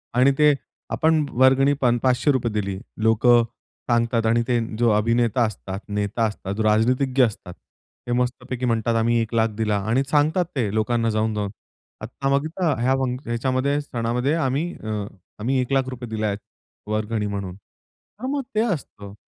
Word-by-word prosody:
आणि 130 +3 +5
ते, 150 -1 +6 0.4
आपण 160 -1 +2 0.2
वर्गणी 135 +2 +5
पण, 120 -2 +3
500 130 -1 +2
दिली. 100 -2 -2 0.2
लोकं 120 +2 +5 0.5
सांगतात 115 -1 +2
आणि 115 +1 +3
ते 120 -1 +2 0.2
जो 120 0 +3
अभिनेता 115 +2 +2
असतात, 95 -2 -5
नेता 105 +2 -1
असतात, 100 -2 -4
जो 110 - -1
राजनीतिज्ञ 125 +5 +3
असतात. 100 -5 -6 0.5
हे - - -2
मस्त 125 0 -1
पैकी 130 0 -2
म्हणतात, 115 -1 +1
आम्ही 115 +1 +2
1 115 0 -4
लाख 110 0 +3
दिला 105 -2 +1
आणि 130 +4 +2
सांगतात 155 +4 +2
ते 120 -6 0
लोकांना 115 +1 +1
जाऊन-जाऊन. 110 -2 -1 0.5
आता 125 +5 -3
बघता 160 +3 -1
ह्या 130 +2 +3
फंक् 130 +1 -3
ह्याच्यामध्ये 130 +4 0
सणामध्ये 125 +1 -1
आम्ही 155 +2 0
अ, - - -6 0.5
आम्ही 130 +5 0
1 125 - -4
लाख 135 -1 +1
रुपये 125 -2 -7
दिले 110 -1 -2
आहेत 100 -1 -1 0.5
वर्गणी 110 0 -1
म्हणून. 100 -3 -4
तर 200 - -16
मग 280 +1 -1
ते 215 - +3
असतं. 100 - -8
120 Hz, 160 wpm, -23 LUFS, 110-130 Hz, 0.5 s, ते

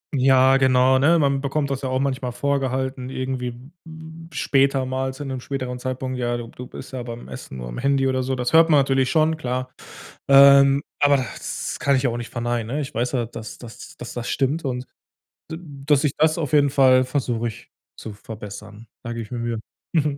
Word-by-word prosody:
Ja, 130 0 +5
genau, 130 0 +4
ne, 165 +5 +4
man 140 -2 +1
bekommt 140 +1 -1
das 135 0 -3
ja 130 - -3
auch 130 0 0
manchmal 130 -2 -2
vorgehalten, 130 0 -2
irgendwie, 130 -1 -3 0.4
hm, 160 +1 -11
später 135 -2 +2
mal 130 +1 -2
zu 145 +2 -7
'nem 130 -2 -5
späteren 130 -2 -4
Zeitpunkt: 130 0 -4
„Ja, 120 -1 -1
du 120 - -7
b - - -16
du 125 - -8
bist 130 - -10
ja 125 -2 -4
beim 120 0 -8
Essen 125 - -9
nur - - -6
am - - -7
Handy.“ 135 0 +1
oder 130 -1 0
so. 130 +1 -1
Das 125 +3 -2
hört 165 0 +6
man 150 -3 +6
natürlich 135 -1 +2
schon, 160 +1 +3
klar. 130 -3 -3 0.6
Ähm, 140 0 +7 0.2
aber 145 0 +4
das 130 -3 -5
kann 140 -1 +2
ich 130 0 +1
auch 120 - -2
nicht 120 0 -6
verneinen, 120 -1 -2
ne, - - -1
ich 140 +1 -6
weiß 120 +2 -1
ja, 120 -3 0
dass 110 -1 -9
dass 120 -2 -12
dass 120 - -8
das 120 -1 -5
stimmt 140 +5 0
und 125 -2 -3 0.6
d 160 - -5 0.3
dass 145 -1 +3
ich 150 - +2
das 155 +1 +3
auf 150 -5 -3
jeden 145 -2 +4
Fall 130 -2 +5
versuche 125 -3 -1
ich 110 - -10 0.3
zu 110 - -7
verbessern. 105 +1 -10 0.2
Da 120 -1 -5
gebe 115 - -4
ich 110 - -14
mir 120 - -4
Mühe. 115 -1 -2 0.3
Mhm. 150 -3 +1
130 Hz, 215 wpm, -22 LUFS, 125-140 Hz, 0.6 s, Ähm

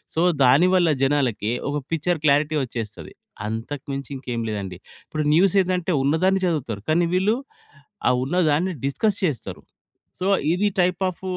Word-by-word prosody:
So, 160 - +1 0.2
దాని 140 +9 +5
వల్ల 175 -3 +4 0.2
జనాలకి 125 -6 0 0.2
ఒక 145 - -1 0.2
పిక్చర్ 165 0 0
క్లారిటీ 150 +2 +3
వచ్చేస్తది. 115 -3 -7 0.3
అంతకు 115 +6 -5
మించి 140 0 -5
ఇంకేమి 125 -3 -4
లేదండి. 100 -4 -4 0.3
ఇప్పుడు 155 -1 -3
న్యూస్ 185 +4 +4
ఏందంటే, 180 -1 -1
ఉన్నదాన్ని 180 +7 +2
చదువుతారు. 135 - -2
కానీ 170 +2 +3
వీళ్ళు 190 +5 +2 0.7
ఆ - - +4
ఉన్నదాన్ని 165 +3 +1
డిస్కస్ 200 +9 0
చేస్తారు. 150 -10 -3 0.6
సో, 185 - -2 0.3
ఇది 185 +4 +1
టైప్ 180 +2 +1
ఆ‌ఫ్ 185 - -8
155 Hz, 140 wpm, -23 LUFS, 130-180 Hz, 0.7 s, దాని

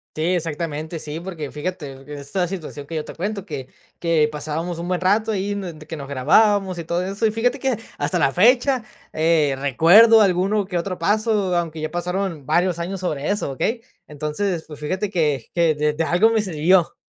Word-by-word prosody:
Sí, 155 - -3
exactamente. 160 -1 -3
Sí, 155 +2 -6
porque 170 -5 -6
fíjate 150 -4 -6
que 145 +2 -8
esta 145 +6 -2
situación 155 -6 -7
que 165 - -6
yo 155 - -2
te - - -9
cuento, 200 +2 -4
que 130 -8 -6 0.3
que 165 -3 +2
pasábamos 160 +3 -4
un 175 - -5
buen 180 -1 0
rato 210 +4 +2
ahí, 205 -1 -1
de 170 -6 -7
que 160 - -6
nos 140 -1 -8
grabábamos 190 +8 +3
y 170 - -5
todo 170 +2 -1
eso. 195 +4 -3
Y - - +3
fíjate 245 +5 0
que 265 -3 0 0.2
hasta 145 0 0
la 135 - +2
fecha, 245 +5 +4 0.3
eh, 155 -3 +2
recuerdo 190 - +6
alguno 195 +2 +2
que 185 -1 -5
otro 180 +2 -2
paso, 205 0 +1
aunque 165 -2 -2
ya 155 - -3
pasaron 175 -4 -3
varios 175 -1 +1
años 185 +3 -3
sobre 150 -6 -2
eso, 205 -9 -1
¿okey? 225 - -2 0.3
Entonces, 160 +4 -3
pues, 150 -2 -11
fíjate 185 +7 -2
que 150 - 0
que 165 -3 +3
de 150 0 +1
de 160 +2 -1
algo 180 +7 +3
me 225 -2 +2
sirvió. 175 -1 +2
175 Hz, 195 wpm, -22 LUFS, 150-195 Hz, 0.3 s, recuerdo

